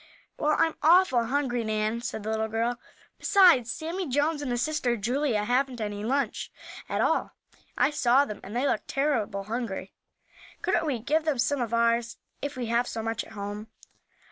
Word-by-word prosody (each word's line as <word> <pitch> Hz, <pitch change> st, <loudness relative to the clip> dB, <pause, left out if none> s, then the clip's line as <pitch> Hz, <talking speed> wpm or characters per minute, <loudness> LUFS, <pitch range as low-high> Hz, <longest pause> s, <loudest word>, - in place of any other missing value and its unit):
"Well, 305 Hz, +1 st, +2 dB
I'm 325 Hz, -1 st, +3 dB
awful 320 Hz, -7 st, +5 dB
hungry, 250 Hz, -2 st, 0 dB
Nan," 215 Hz, +1 st, -1 dB
said 230 Hz, -3 st, -5 dB
the 220 Hz, -, -2 dB
little 220 Hz, 0 st, 0 dB
girl. 230 Hz, +2 st, -1 dB, 0.4 s
"Besides, 345 Hz, -, +5 dB
Sammie 340 Hz, +3 st, -4 dB
Jones, 290 Hz, +3 st, +1 dB
and 285 Hz, -, -3 dB
his 240 Hz, 0 st, 0 dB
sister 260 Hz, -6 st, 0 dB
Julia, 240 Hz, 0 st, 0 dB
haven't 250 Hz, +2 st, 0 dB
any 205 Hz, -1 st, -4 dB
lunch 275 Hz, +5 st, -1 dB, 0.4 s
at -, -, 0 dB
all. -, -, +1 dB, 0.4 s
I -, -, +3 dB
saw 270 Hz, -1 st, +4 dB
them, 210 Hz, -, -7 dB
and 205 Hz, +4 st, -9 dB
they 250 Hz, +3 st, +1 dB
looked -, -, -1 dB
terrible 230 Hz, -9 st, 0 dB
hungry. 215 Hz, -3 st, -4 dB, 0.7 s
Couldn't 325 Hz, -, +1 dB
we 275 Hz, -5 st, 0 dB
give 295 Hz, +8 st, 0 dB
them 305 Hz, -4 st, +1 dB
some 275 Hz, +2 st, +1 dB
of 230 Hz, -2 st, -2 dB
ours; 235 Hz, 0 st, +1 dB, 0.2 s
if 285 Hz, -1 st, -4 dB
we 250 Hz, -, -2 dB
have 235 Hz, +2 st, +1 dB
so 225 Hz, -, -4 dB
much 225 Hz, 0 st, -2 dB
at -, -, -14 dB
home?" 205 Hz, +1 st, -6 dB
240 Hz, 180 wpm, -27 LUFS, 220-285 Hz, 0.7 s, awful